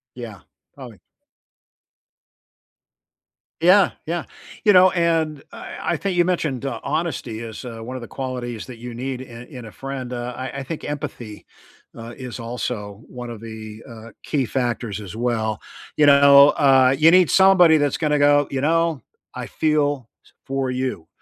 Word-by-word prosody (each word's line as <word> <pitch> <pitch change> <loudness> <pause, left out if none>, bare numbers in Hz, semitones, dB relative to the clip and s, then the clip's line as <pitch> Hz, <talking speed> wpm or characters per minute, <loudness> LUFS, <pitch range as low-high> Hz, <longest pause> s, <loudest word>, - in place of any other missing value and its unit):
Yeah, 115 -5 -8 0.4
probably. - - -11 2.6
Yeah, 185 +4 +5
yeah, 170 0 -3 0.4
you 210 - +6
know 185 0 +7
and 165 -4 0
I - - -9 0.2
I - - -1
think 195 -2 -2
you 175 -1 +3
mentioned, 150 -8 -1
uh, 135 - -3
honesty 150 -7 -3
is, 115 0 -8
uh, 115 -2 -7
one 125 +3 -7
of 130 - -6
the 120 - -8
qualities 125 -4 -5
that 125 -3 -10
you 120 +1 -8
need 130 +2 -5
in 120 -2 -10
in 125 -5 -10
a 110 - -10
friend, 135 -1 -6
uh, 120 0 -4
I 130 +1 -5
I - - -5
think 150 +4 -6
empathy, 140 -7 -6 0.5
uh, 115 +1 -8
is 125 -2 -7
also 115 -3 -5
one 125 -1 -8
of 115 - -8
the, 110 -1 -9
uh, 115 0 -11
key 140 -4 -1
factors 120 -4 -2
as 100 0 -9
well. 110 -3 -1 0.4
You 150 - +4
know, 140 0 +8
uh, 135 -3 +4
you 155 +3 +6
need 180 -1 +5
somebody 190 -4 +6
that's 145 -2 0
gonna 150 -2 +1
go, 145 0 +4
"You 135 -1 -2
know, 165 -1 +1 0.3
I - - -6
feel 145 -5 0 0.4
for 135 -1 -2
you 125 -10 -3
130 Hz, 165 wpm, -22 LUFS, 120-150 Hz, 2.6 s, know